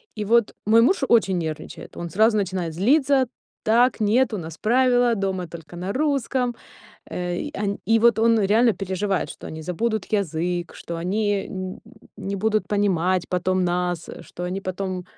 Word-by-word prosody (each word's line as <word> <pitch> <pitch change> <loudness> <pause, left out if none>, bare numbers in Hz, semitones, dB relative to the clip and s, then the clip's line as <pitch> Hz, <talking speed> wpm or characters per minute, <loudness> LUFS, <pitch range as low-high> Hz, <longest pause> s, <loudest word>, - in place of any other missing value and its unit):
И 210 -1 -3
вот 235 +1 +3
мой 225 +2 +6
муж 275 +4 +3
очень 195 -6 +3
нервничает, 160 -2 -6
он 170 0 -5
сразу 215 +5 +3
начинает 185 -4 -2
злиться: 265 - +3 0.4
"Так, 240 +3 +3
нет, 225 +3 +2
у - - -1
нас 160 -2 -7
правила, 245 0 +3
дома 190 -3 -2
только 165 +1 -11
на 180 +3 -4
русском". 265 -4 0 0.6
Э, 175 -1 -3
и 295 +9 -4
он 200 -1 -2
и 225 +1 +4
вот 235 -2 +5
он 230 -1 +4
реально 220 +4 +4
переживает, 190 0 -2
что - - -9
они 160 0 -7
забудут 215 +5 -2
язык, 175 -3 -2
что 170 - -6
они 200 +3 -1
нь 185 -1 -5 0.4
не 200 +1 -4
будут 215 +2 0
понимать 185 -3 +1
потом 185 0 0
нас, 175 -1 -1
что 175 - -9
они 185 +2 -3
потом 185 -1 -4
200 Hz, 165 wpm, -23 LUFS, 180-230 Hz, 0.6 s, мой